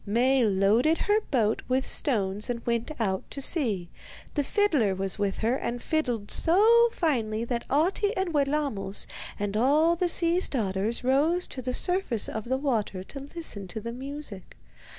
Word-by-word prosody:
Maie 250 Hz, +5 st, +2 dB
loaded 215 Hz, +10 st, +3 dB
her 420 Hz, +1 st, +1 dB
boat 225 Hz, -5 st, +1 dB
with 260 Hz, +1 st, +1 dB
stones 210 Hz, -5 st, +1 dB
and 235 Hz, -1 st, -4 dB
went 235 Hz, -1 st, -1 dB
out 190 Hz, -4 st, 0 dB
to -, -, -6 dB
sea. 235 Hz, -, 0 dB, 0.5 s
The 290 Hz, -, 0 dB
fiddler 280 Hz, -, +1 dB
was 190 Hz, +1 st, -2 dB
with 200 Hz, -1 st, 0 dB
her, 230 Hz, +3 st, +1 dB
and 245 Hz, -2 st, -3 dB
fiddled 245 Hz, -9 st, -2 dB
so 455 Hz, +7 st, +5 dB
finely 230 Hz, -, -1 dB
that 235 Hz, -1 st, -3 dB
Ahti 375 Hz, -, +1 dB
and 375 Hz, -3 st, -1 dB
Wellamos 280 Hz, -9 st, 0 dB, 0.3 s
and 205 Hz, 0 st, -2 dB
all 300 Hz, +9 st, +3 dB
the 350 Hz, +1 st, 0 dB
sea's 340 Hz, +2 st, +2 dB
daughters 215 Hz, -1 st, -1 dB
rose 300 Hz, +8 st, +2 dB
to 260 Hz, -, -6 dB
the 250 Hz, 0 st, -2 dB
surface 355 Hz, -, +1 dB
of 220 Hz, -1 st, -5 dB
the 260 Hz, +2 st, 0 dB
water 225 Hz, -9 st, -2 dB
to 275 Hz, -, -8 dB
listen 275 Hz, -, -6 dB
to 180 Hz, -, -6 dB
the 235 Hz, +2 st, -6 dB
music. 260 Hz, -, -8 dB
255 Hz, 165 wpm, -27 LUFS, 215-310 Hz, 0.5 s, so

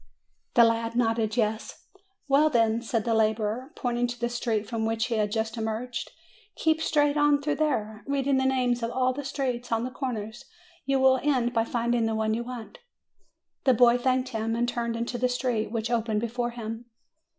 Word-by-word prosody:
The 235 Hz, -, +8 dB
lad 230 Hz, 0 st, +1 dB
nodded, 225 Hz, -2 st, +1 dB
"Yes." 220 Hz, -1 st, -2 dB, 0.4 s
"Well, 290 Hz, +3 st, +4 dB
then," 230 Hz, -3 st, +2 dB
said 230 Hz, -1 st, -1 dB
the 230 Hz, -, +1 dB
laborer, 220 Hz, +4 st, 0 dB
pointing 245 Hz, -1 st, -1 dB
to 245 Hz, 0 st, -6 dB
the 240 Hz, 0 st, -1 dB
street 230 Hz, -3 st, -1 dB
from 230 Hz, -2 st, -2 dB
which 225 Hz, 0 st, 0 dB
he 240 Hz, -, -2 dB
had 210 Hz, -1 st, 0 dB
just 225 Hz, +1 st, -2 dB
emerged, 225 Hz, +3 st, -3 dB, 0.5 s
"keep 320 Hz, 0 st, +1 dB
straight 295 Hz, -2 st, +2 dB
on 295 Hz, -1 st, +4 dB
through 295 Hz, +1 st, -1 dB
there, 220 Hz, -8 st, -1 dB
reading 275 Hz, -1 st, +1 dB
the 265 Hz, -, +1 dB
names 250 Hz, -2 st, +1 dB
of 230 Hz, -, -1 dB
all 255 Hz, +1 st, +1 dB
the 285 Hz, +2 st, -5 dB
streets 255 Hz, -3 st, -3 dB
on 225 Hz, 0 st, +1 dB
the 255 Hz, -, -4 dB
corners; 225 Hz, -4 st, -5 dB, 0.4 s
you 275 Hz, -1 st, +2 dB
will 260 Hz, 0 st, +5 dB
end 255 Hz, -5 st, +1 dB
by 225 Hz, -1 st, +2 dB
finding 235 Hz, -1 st, 0 dB
the 225 Hz, -, -1 dB
one 220 Hz, 0 st, 0 dB
you 235 Hz, +2 st, -2 dB
want." 250 Hz, -, -8 dB, 0.9 s
The 260 Hz, -2 st, +5 dB
boy 240 Hz, +1 st, +6 dB
thanked 255 Hz, 0 st, +1 dB
him, 225 Hz, -1 st, -2 dB
and 240 Hz, +1 st, 0 dB
turned 235 Hz, -1 st, -2 dB
into 235 Hz, +1 st, -3 dB
the 250 Hz, +1 st, +2 dB
street 245 Hz, -3 st, -1 dB
which 230 Hz, 0 st, -2 dB
opened 220 Hz, -2 st, 0 dB
before 240 Hz, +1 st, -2 dB
him. 230 Hz, 0 st, -6 dB
240 Hz, 195 wpm, -27 LUFS, 225-255 Hz, 0.9 s, The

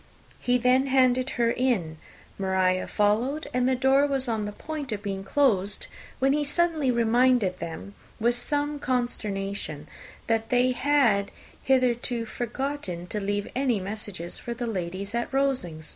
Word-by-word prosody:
He 245 Hz, 0 st, +2 dB
then 255 Hz, +2 st, +3 dB
handed 255 Hz, -1 st, +3 dB
her 235 Hz, -1 st, +3 dB
in, 205 Hz, -12 st, 0 dB, 0.4 s
Maria 190 Hz, -1 st, +1 dB
followed, 225 Hz, +9 st, +1 dB
and 250 Hz, +1 st, +2 dB
the 260 Hz, -, +2 dB
door 270 Hz, +2 st, +4 dB
was 270 Hz, -2 st, -1 dB
on 220 Hz, -3 st, -1 dB
the 205 Hz, -, -4 dB
point 295 Hz, +3 st, -6 dB
of 205 Hz, -2 st, -4 dB
being 195 Hz, -2 st, -3 dB
closed, 205 Hz, -4 st, +1 dB, 0.3 s
when 270 Hz, +1 st, +3 dB
he 295 Hz, 0 st, +1 dB
suddenly 310 Hz, -1 st, +1 dB
reminded 235 Hz, -4 st, +3 dB
them, 170 Hz, +4 st, -6 dB, 0.3 s
with 235 Hz, +2 st, +3 dB
some 290 Hz, +4 st, 0 dB
consternation, 200 Hz, -, -2 dB, 0.4 s
that 225 Hz, -1 st, 0 dB
they 250 Hz, 0 st, +3 dB
had 245 Hz, -7 st, +2 dB, 0.3 s
hitherto 245 Hz, -2 st, +1 dB
forgotten 240 Hz, -6 st, -4 dB
to 210 Hz, -, -2 dB
leave 205 Hz, 0 st, -2 dB
any 255 Hz, -5 st, +1 dB
message 195 Hz, -3 st, -6 dB
for 235 Hz, -, -5 dB
the 240 Hz, +1 st, -3 dB
ladies 195 Hz, -1 st, -4 dB
of 235 Hz, 0 st, -2 dB
Rosings. 250 Hz, -, -1 dB
240 Hz, 145 wpm, -26 LUFS, 200-265 Hz, 0.4 s, door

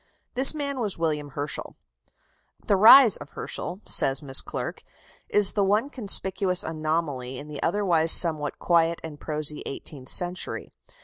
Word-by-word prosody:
This 265 Hz, +4 st, +5 dB
man 280 Hz, -3 st, -4 dB
was 210 Hz, -5 st, -2 dB
William 150 Hz, -3 st, -3 dB
Herschel. 145 Hz, +1 st, -5 dB, 0.9 s
"The 200 Hz, -, +2 dB
rise 225 Hz, +3 st, +7 dB
of -, -, -13 dB
Herschel," 180 Hz, +4 st, -7 dB
says 135 Hz, +2 st, +1 dB
Miss 135 Hz, -2 st, +2 dB
Clerke, -, -, -7 dB, 0.5 s
"is 205 Hz, -2 st, +3 dB
the 205 Hz, -, 0 dB
one 210 Hz, +8 st, 0 dB
conspicuous 195 Hz, -6 st, -1 dB
anomaly 155 Hz, -5 st, -4 dB
in 150 Hz, +3 st, -9 dB
the 150 Hz, -, -6 dB
otherwise 170 Hz, -3 st, +1 dB
somewhat 155 Hz, -4 st, +4 dB
quiet 170 Hz, -1 st, +1 dB
and 155 Hz, -3 st, -9 dB
prosy 150 Hz, -1 st, -3 dB
eighteenth 135 Hz, -1 st, -9 dB
century. 180 Hz, +1 st, -4 dB
165 Hz, 140 wpm, -24 LUFS, 150-200 Hz, 0.9 s, rise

